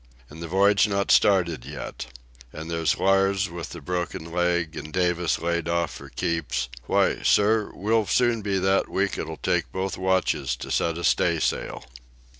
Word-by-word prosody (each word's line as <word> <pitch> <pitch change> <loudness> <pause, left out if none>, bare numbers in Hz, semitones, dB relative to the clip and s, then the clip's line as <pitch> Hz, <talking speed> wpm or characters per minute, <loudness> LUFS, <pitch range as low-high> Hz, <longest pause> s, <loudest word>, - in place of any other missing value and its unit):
And 80 +2 -10
the 85 - -5
voyage 100 +4 +4
not 100 -1 0
started 85 -9 +3
yet. - - -7 0.4
And 80 +2 -7
there's 80 -3 0
Lars 95 0 +2
with 85 -1 -6
the 85 - -9
broken 85 0 -4
leg, 85 -2 0
and 75 +1 -7
Davis 90 -1 +1
laid 85 0 -2
off 85 -1 0
for - - -10
keeps—why, 65 -8 -1
sir, 105 +1 +3
we'll 110 +1 +1
soon 120 -2 +2
be 100 -1 -1
that 95 +1 +1
weak 100 +1 -1
it'll - - -5
take - - -1
both 95 -1 -3
watches 95 -9 0
to - - -8
set 85 0 0
a 85 - -5
staysail." - - 0
90 Hz, 160 wpm, -25 LUFS, 80-95 Hz, 0.4 s, voyage